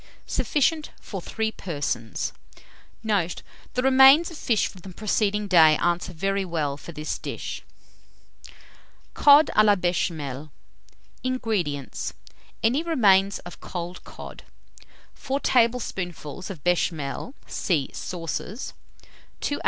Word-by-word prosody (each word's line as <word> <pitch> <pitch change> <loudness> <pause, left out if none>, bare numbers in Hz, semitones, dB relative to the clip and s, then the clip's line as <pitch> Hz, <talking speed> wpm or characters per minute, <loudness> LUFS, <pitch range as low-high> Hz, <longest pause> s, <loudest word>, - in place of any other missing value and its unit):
Sufficient 305 +2 +1
for 195 -4 -7
3 220 +4 -2
persons. 145 - -3 0.7
Note. 200 -6 0 0.3
The 250 - +1
remains 270 +5 +7
of 330 - -9
fish 225 -4 +2
from 190 - -7
the 190 - -10
preceding 210 +1 0
day 160 -5 +6
answer 175 +1 0
very 195 +4 -1
well 155 -6 -2
for 150 - -10
this 155 -1 -4
dish. - - -5 1.5
COD 290 +1 +7
A 215 - +7
LA 205 -1 +5
BECHAMEL. 155 -6 -2 0.7
239. 255 0 -1
INGREDIENTS. 175 - -2 0.5
Any 245 +7 +3
remains 200 - +4
of 175 - -10
cold 175 0 -6
cod, - - -10 0.7
4 275 +1 -3
tablespoonfuls 195 - 0
of 170 -8 -8
béchamel 175 - -1
(see 155 -8 -1
Sauces), 180 - -5 0.7
2 285 - -1
oz. - - -8
190 Hz, 115 wpm, -25 LUFS, 165-235 Hz, 1.5 s, remains